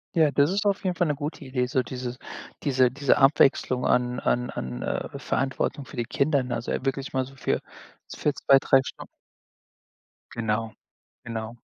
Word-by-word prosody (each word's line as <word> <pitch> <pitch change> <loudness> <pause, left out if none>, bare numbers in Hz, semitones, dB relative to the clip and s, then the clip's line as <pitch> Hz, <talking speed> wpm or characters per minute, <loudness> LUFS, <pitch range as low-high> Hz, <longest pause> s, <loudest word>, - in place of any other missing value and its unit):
Ja, 155 -3 +4
das 145 +2 +3
ist 200 +2 -1
auf 200 -1 +1
jeden 180 - 0
Fall 175 -1 +1
'ne 150 - 0
gute 150 +3 -5
Idee, 130 -1 -1
so 130 0 +1
diese 125 -1 -5 0.5
diese 130 -3 +3
diese 140 +1 +2
Abwechslung 135 -2 +4
an 125 0 +1
an 125 0 0
an, 65 -1 -5
äh, - - -3
Verantwortung 135 +2 -1
für 130 - -12
die 120 - 0
Kinder, 140 +3 +1
ne? 125 -1 -3
Also, 115 - -4
äh, 135 - -2
wirklich 135 0 -2
mal 130 0 0
so 135 +1 -14
für - - -1 0.5
so - - -9
für 150 - +2
2, 135 - +5
3 135 0 +4
Stun - - -8 1.3
Genau, 110 -1 -1 0.5
genau. 115 0 -5
130 Hz, 185 wpm, -26 LUFS, 125-145 Hz, 1.3 s, 2